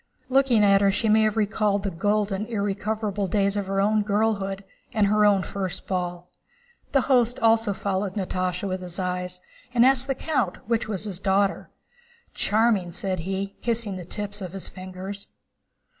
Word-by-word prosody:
Looking 260 -4 +4
at 200 -1 +5
her 200 - +4
she 215 +3 +1
may 220 +1 +5
have 215 0 0
recalled 210 -1 +1
the 200 - -1
golden, 205 +3 0
irrecoverable 205 -1 -2
days 200 +1 +1
of 200 -2 -2
her 195 0 0
own 210 +2 +3
girlhood 200 -2 0 0.3
and 215 -2 +2
her 210 +1 +3
own 200 -2 +4
first 190 -1 -4
ball. 180 -1 -3 0.6
The 275 - +4
host 245 -2 +2
also 225 -2 +3
followed 195 0 -2
Natásha 185 -1 -2
with 185 -1 -3
his 180 -1 -7
eyes 180 -1 -3 0.4
and 240 +1 +6
asked 265 0 +4
the 270 - 0
count 265 - -1
which 230 -1 0
was 205 -3 -3
his 195 -4 -4
daughter. 195 0 +1 0.6
"Charming!" 215 -5 +2
said 185 +1 -2
he, 195 +3 -4
kissing 230 -4 -1
the 185 - -6
tips 205 +3 -5
of 185 -2 -6
his 195 - -3
fingers. 185 +2 -7
200 Hz, 170 wpm, -25 LUFS, 190-215 Hz, 0.6 s, and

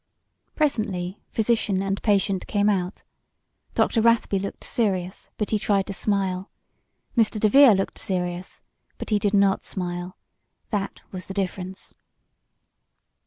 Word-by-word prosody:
Presently 210 - -1
physician 215 -4 +1
and 195 0 -2
patient 200 -2 +1
came 205 -1 +2
out 185 -2 -1 0.7
Dr. 225 - +2
Rathby 230 -3 +3
looked 200 - -6
serious, 190 -5 -1
but 210 - -2
he 215 - +2
tried 200 -2 +1
to 200 - -5
smile. 190 -1 -1 0.7
Mr. 225 -2 +2
DeVere 225 +2 +7
looked 195 - -2
serious 180 -3 -3 0.3
but - - -7
he 210 - +3
did 205 0 +1
not 195 -1 +3
smile. 175 -1 -4 0.5
That 200 -2 -2
was 185 -1 -7
the 190 - -7
difference. 190 -1 -4
195 Hz, 125 wpm, -24 LUFS, 185-215 Hz, 0.7 s, DeVere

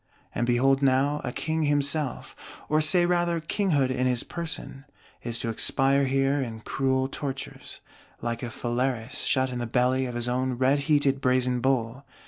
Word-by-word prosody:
And 120 - -1
behold 135 +3 +3
now 140 +2 +2
a 125 - -3
King 160 +4 -2
himself, 145 -1 0 0.3
or 155 +1 +3
say 175 +3 +5
rather 175 -1 +1
King 195 +5 -2
hood 140 -5 +2
in 130 0 0
his 125 -2 0
person, 165 -5 -7 0.4
is 120 -1 -3
to 115 - -2
expire 135 +4 +2
here 135 +1 +1
in 115 -4 -5
cruel 130 +2 0
tortures, 135 0 -6 0.4
like 115 0 -3
a 120 - -4
Phalaris 120 +1 -2
shut 130 -1 +1
in 125 - -4
the 120 - -3
belly 130 +2 +1
of 120 - -6
his 120 0 -1
own 130 +1 0
red 130 +3 +2
heated 140 -2 +2
Brazen 125 -1 +2
Bull! 130 0 -1
130 Hz, 170 wpm, -26 LUFS, 125-145 Hz, 0.4 s, say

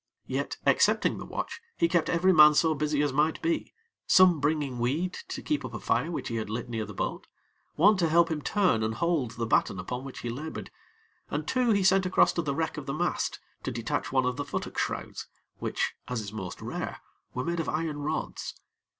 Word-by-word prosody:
Yet, - - -3
excepting - - +3
the - - -7
watch, - - -5 0.2
he 170 - +3
kept 170 -1 +1
every 185 +3 +4
man 150 -2 +8
so 160 0 +4
busy 150 0 0
as 145 -2 0
might 150 +3 +2
be, 330 -1 0 0.4
some 185 -4 +6
bringing 145 -3 0
weed 155 +10 0
to - - -6
keep 150 -2 -1
up 125 -2 -6
a - - -4
fire 120 +11 0
which 170 - -4
he 115 - -2
had 110 - -3
lit 115 +2 -4
near 110 -2 -2
the - - -9
boat; - - -3 0.5
one 205 +6 +5
to 170 -3 +2
help 170 +1 +4
him 155 -2 -2
turn 185 - +2
and 110 0 -1
hold 155 -7 0
the 115 - -1
batten 110 - +2
upon 125 +8 -4
which 135 -1 -8
he 120 - -3
labored; 150 +6 -6 0.6
and 150 +1 -3
two 255 -2 +2
he 200 -3 +3
sent 190 0 +4
across 185 - +4
to 170 - 0
the 140 -4 -2
wreck 160 +1 -2
of 145 -2 -6
the 135 - -2
mast, 175 +3 -1 0.2
to - - -3
detach - - -2
one 130 -1 +2
of 125 0 -1
the - - -1
futtock - - -5
shrouds, - - -3 0.3
which - - -1
(as 125 -2 -2
is 105 -1 -6
most 95 -5 -6
rare) - - -4 0.4
were 125 - -2
made 170 0 -1
of 165 - -1
iron 155 -2 -2
rods. 150 +2 -3
150 Hz, 220 wpm, -28 LUFS, 125-170 Hz, 0.6 s, man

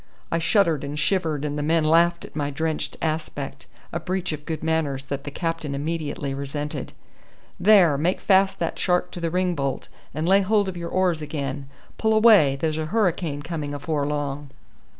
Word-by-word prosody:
I 165 - +1
shuddered 165 - +2
and 145 +1 -5
shivered, 155 -3 0
and 150 0 -2
the - - -1
men 160 +2 +2
laughed 170 +2 +3
at - - -14
my 145 -2 -1
drenched 155 +2 -3
aspect, 155 -4 -3 0.3
a 170 - -1
breach 185 +1 -2
of 150 -1 -7
good 160 -1 -3
manners 155 -4 -1
that 140 0 -5
the - - -3
captain 165 -2 -3
immediately 145 -2 -3
resented. 140 +2 -4 0.7
"There, 180 -7 +5
make 175 +5 +1
fast 195 0 +3
that 165 - -3
shark 180 -1 +1
to - - -7
the 165 - 0
ring 180 +1 +1
bolt, 140 -4 -3 0.2
and 155 +4 -2
lay 195 +2 +5
hold 205 +1 +2
of 190 - -4
your 170 -1 -5
oars 180 -4 +1
again. 140 -2 -4 0.3
Pull 220 0 +2
away, 215 -11 +6
there's 155 +2 -1
a 155 - -2
hurricane 170 -7 0
coming 150 -3 -4
afore 145 0 -2
long." 145 -1 -3
160 Hz, 185 wpm, -24 LUFS, 145-175 Hz, 0.7 s, away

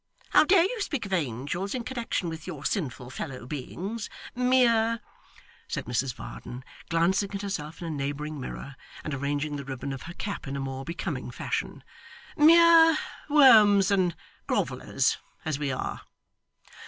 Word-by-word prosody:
How - - +7
dare 360 0 +6
you 430 +4 -2
speak 290 - -2
of 195 - -5
angels 150 - -2
in 245 - -3
connection 235 -7 -3
with 160 0 -6
your 160 -6 -7
sinful 130 - -2
fellow 130 -3 -6
beings 185 - -5 0.2
mere' 240 -2 +3 0.7
said - - -4
Mrs 125 +1 -1
Varden, 120 +1 -8 0.3
glancing 185 +4 +1
at 200 - -4
herself 165 -6 -5
in 170 - -4
a - - -3
neighbouring 145 +1 -4
mirror, 135 +1 -7 0.3
and 155 - -4
arranging 145 +2 -2
the 140 - -5
ribbon 135 0 -5
of 135 - -7
her 170 +1 -9
cap 200 -6 -5
in 135 - -4
a - - -3
more 135 0 -4
becoming 170 +4 -4
fashion - - -4 0.5
'mere 325 +1 +7 0.3
worms 215 -9 +7
and 185 -4 +2 0.3
grovellers - - 0 0.3
as 155 -3 -1
we 145 -2 -1
are! 130 - -4
170 Hz, 155 wpm, -27 LUFS, 140-230 Hz, 0.7 s, How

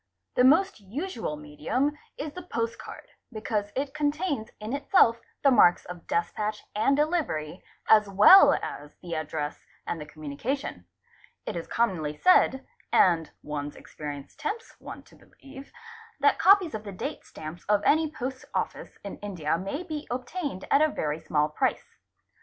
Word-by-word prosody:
The 250 - +3
most 330 - +4
usual 225 - -4
medium 155 - -2 0.2
is 295 0 -5
the 360 - -7
postcard, 230 -9 -5 0.2
because 215 -2 -2
it 270 +1 -2
contains 295 -5 -1
in 215 +3 -5
itself 280 -5 +3 0.2
the 275 - +6
marks 175 -8 +5
of 175 -1 -10
despatch 210 +5 -2
and 275 +7 +3
delivery 295 - -1 0.2
as 210 -2 +5
well 210 - +8
as 145 +1 -7
the 175 -1 -5
address 155 -1 -4 0.2
and 165 - -4
the 150 - -8
communication; 150 - -5 0.6
it - - -4
is 170 - -5
commonly 160 -10 -1
said, 270 -7 +4 0.3
and 165 -3 +4
one's 145 -1 -5
experience 145 -2 -8
tempts 410 +9 -5
one - - -9
to - - -20
believe, 275 0 -14 0.5
that 285 0 +3
copies 375 -3 +5
of 215 - -5
the 205 - -7
date 185 - -5
stamps 155 +3 -9
of 210 -1 +3
any 315 +1 +4
post 260 -2 -5
office - - -3
in 200 - -7
India 175 -7 -2
may 195 - -4
be 310 -4 -6
obtained 255 - -4
at 280 - +5
a 310 - +6
very 155 - -2
small 150 -2 +1
price. 150 - -2
220 Hz, 150 wpm, -27 LUFS, -, 0.6 s, well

